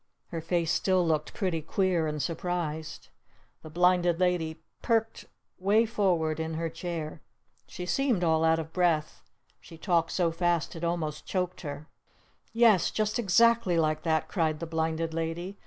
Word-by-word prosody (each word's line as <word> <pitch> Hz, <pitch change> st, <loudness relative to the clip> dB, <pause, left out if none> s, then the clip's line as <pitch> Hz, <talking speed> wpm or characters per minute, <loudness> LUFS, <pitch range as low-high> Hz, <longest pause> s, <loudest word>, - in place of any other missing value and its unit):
Her 165 Hz, -2 st, -4 dB
face 165 Hz, 0 st, 0 dB
still 185 Hz, 0 st, +2 dB
looked 155 Hz, -2 st, -1 dB
pretty 180 Hz, -5 st, -1 dB
queer 175 Hz, 0 st, 0 dB
and 150 Hz, 0 st, -3 dB
surprised. 160 Hz, -1 st, -4 dB, 0.5 s
The 155 Hz, -, -10 dB
Blinded 175 Hz, +1 st, +2 dB
Lady 170 Hz, -3 st, 0 dB, 0.2 s
perked 225 Hz, -1 st, 0 dB, 0.3 s
way 205 Hz, +5 st, +3 dB
forward 180 Hz, -8 st, 0 dB
in 160 Hz, 0 st, -3 dB
her 165 Hz, +1 st, -2 dB
chair. 165 Hz, -2 st, -5 dB, 0.5 s
She 180 Hz, -, -7 dB
seemed 240 Hz, -2 st, +1 dB
all 160 Hz, -1 st, +2 dB
out 160 Hz, 0 st, +4 dB
of 160 Hz, 0 st, -6 dB
breath. 165 Hz, -4 st, 0 dB, 0.4 s
She 165 Hz, -, -13 dB
talked 170 Hz, -1 st, +1 dB
so 175 Hz, -3 st, +1 dB
fast 175 Hz, 0 st, 0 dB
it 165 Hz, -, -7 dB
almost 165 Hz, -3 st, -2 dB
choked 185 Hz, -1 st, -2 dB
her! 145 Hz, -1 st, -7 dB, 0.6 s
"Yes! 225 Hz, -7 st, +4 dB
Just 215 Hz, +1 st, -1 dB
exactly 230 Hz, -3 st, +3 dB
like 155 Hz, -1 st, +1 dB
that!" 160 Hz, -2 st, 0 dB
cried 160 Hz, -4 st, -1 dB
the 170 Hz, -, -4 dB
Blinded 160 Hz, 0 st, -2 dB
Lady. 165 Hz, +4 st, -4 dB
170 Hz, 155 wpm, -28 LUFS, 160-185 Hz, 0.6 s, out